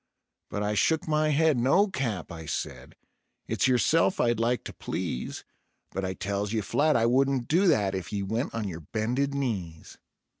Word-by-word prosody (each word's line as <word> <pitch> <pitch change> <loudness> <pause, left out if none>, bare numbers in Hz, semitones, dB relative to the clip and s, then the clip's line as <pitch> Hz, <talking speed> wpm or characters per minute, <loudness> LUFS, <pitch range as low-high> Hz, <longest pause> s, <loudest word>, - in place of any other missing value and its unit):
But 105 - -3
I 105 0 0
shook 160 +12 +1
my 155 0 +2
head: 155 -1 +3
"No, 140 - +4
Cap," 120 - -3
I 80 -1 -8
said; - - -5 0.5
"it's - - +1
yourself 155 +8 +3
I'd 120 -2 +2
like 120 +2 +1
to - - -7
please, 60 - -4 0.5
But 95 - -3
I 95 0 -2
tells 100 +3 -2
ye 110 - +1
flat 150 +9 +2
I 115 - +3
wouldn't 130 0 +2
do 180 +5 +3
that 100 - +3
if 95 -2 -4
ye 100 -2 -2
went 110 +7 -2
on 110 -3 -2
yer 85 -4 -5
bended 120 - -1
knees." 95 - -4
115 Hz, 180 wpm, -27 LUFS, 100-140 Hz, 0.5 s, No